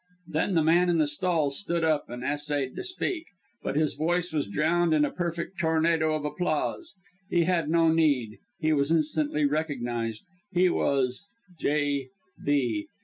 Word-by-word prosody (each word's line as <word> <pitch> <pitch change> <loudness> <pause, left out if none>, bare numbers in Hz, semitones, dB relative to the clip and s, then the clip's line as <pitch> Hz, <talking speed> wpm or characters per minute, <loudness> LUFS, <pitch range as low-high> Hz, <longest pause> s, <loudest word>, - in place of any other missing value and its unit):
Then 165 +4 0
the 160 - +4
man 175 +3 +4
in 170 - +3
the 155 - +4
stalls 145 -2 0
stood 170 -4 -1
up, 155 -2 +1
and 120 +1 -6
essayed 145 -2 -2
to - - -4
speak; 365 -2 -3 0.3
but - - -3
his 155 0 +1
voice 170 +3 -1
was 150 -7 0
drowned 160 - +2
in 150 -1 +4
a - - -3
perfect 170 +1 -4
tornado 160 -1 +2
of 150 -1 -3
applause. 180 - -2 0.3
He 175 -3 +3
had 165 -3 +1
no 165 0 +4
need 140 -9 +2 0.2
he 155 0 +2
was 140 -1 +1
instantly 155 -2 +1
recognized 120 -7 -2 0.3
he 180 +1 +4
was 135 +3 0 0.3
J 145 -2 0 0.4
B 125 -8 0
155 Hz, 160 wpm, -27 LUFS, 145-170 Hz, 0.4 s, the